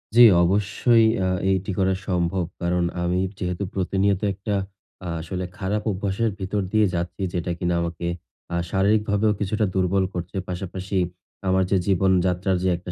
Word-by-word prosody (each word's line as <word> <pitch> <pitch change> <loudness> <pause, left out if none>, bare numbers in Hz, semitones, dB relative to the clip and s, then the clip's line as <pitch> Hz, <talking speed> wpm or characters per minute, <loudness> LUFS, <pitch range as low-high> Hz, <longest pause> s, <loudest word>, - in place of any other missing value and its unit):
জী, 120 - +8 0.2
অবশ্যই। 105 +5 +3 0.2
আ - - +1 0.2
এটি 95 +1 0
করা 95 -1 +2
সম্ভব। 90 0 0 0.2
কারণ 90 0 +1 0.2
আমি 90 +1 +1 0.2
যেহেতু 90 +1 -2
প্রতিনিয়ত, 95 +1 +1
একটা 100 +2 -3 0.5
আ - - -4
আসলে 90 +3 -4
খারাপ 105 +1 -1
অভ্যাসের 100 +3 -1
ভিতর 100 +2 -1
দিয়ে 110 -1 +4
যাচ্ছি। 85 +2 -3
যেটা 90 0 -2
কিনা 90 -1 0
আমাকে 85 0 -3 0.5
আ - - 0
শারীরিকভাবেও 105 +2 +2
কিছুটা 105 +2 0
দুর্বল 95 +1 +2
করছে। 90 +2 -5
পাশাপাশি 95 +2 -4 0.5
আমার 95 0 +3
যে 100 - +4
জীবন 95 0 +3 0.2
যাত্রার 90 +1 0
যে 95 - +2
একটা 90 0 -8
95 Hz, 155 wpm, -24 LUFS, 90-100 Hz, 0.5 s, জী